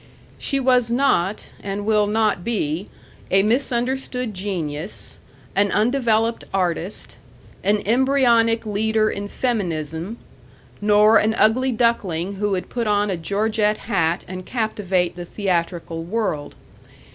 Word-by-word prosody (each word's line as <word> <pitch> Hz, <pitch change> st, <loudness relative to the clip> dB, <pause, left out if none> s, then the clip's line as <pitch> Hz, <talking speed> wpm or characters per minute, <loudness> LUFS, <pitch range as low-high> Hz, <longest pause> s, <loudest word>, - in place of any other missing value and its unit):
She 275 Hz, -, 0 dB
was 250 Hz, -3 st, +3 dB
not 235 Hz, -6 st, +1 dB
and 200 Hz, +1 st, -4 dB
will 210 Hz, -1 st, +3 dB
not 210 Hz, -4 st, +1 dB
be 185 Hz, -5 st, -2 dB, 0.4 s
a 195 Hz, +1 st, +4 dB
misunderstood 250 Hz, 0 st, -1 dB
genius, 180 Hz, -4 st, -5 dB, 0.4 s
an 200 Hz, 0 st, +3 dB
undeveloped 230 Hz, 0 st, +1 dB
artist, 180 Hz, 0 st, -2 dB, 0.5 s
an 205 Hz, +1 st, +2 dB
embryonic 235 Hz, -1 st, +3 dB
leader 215 Hz, +1 st, +1 dB
in 200 Hz, 0 st, -4 dB
feminism, 180 Hz, -, -2 dB, 0.6 s
nor 210 Hz, +1 st, +5 dB
an 220 Hz, +1 st, +1 dB
ugly 255 Hz, +5 st, +3 dB
duckling 200 Hz, -6 st, 0 dB
who 205 Hz, +1 st, 0 dB
would 190 Hz, -2 st, -2 dB
put 235 Hz, -3 st, -3 dB
on 205 Hz, -1 st, +2 dB
a -, -, 0 dB
Georgette 210 Hz, +5 st, 0 dB
hat 175 Hz, -6 st, 0 dB
and 185 Hz, 0 st, -6 dB
captivate 195 Hz, -6 st, -1 dB
the 175 Hz, -, -6 dB
theatrical 170 Hz, -3 st, -2 dB
world. 170 Hz, -6 st, -2 dB
210 Hz, 120 wpm, -22 LUFS, 185-230 Hz, 0.6 s, nor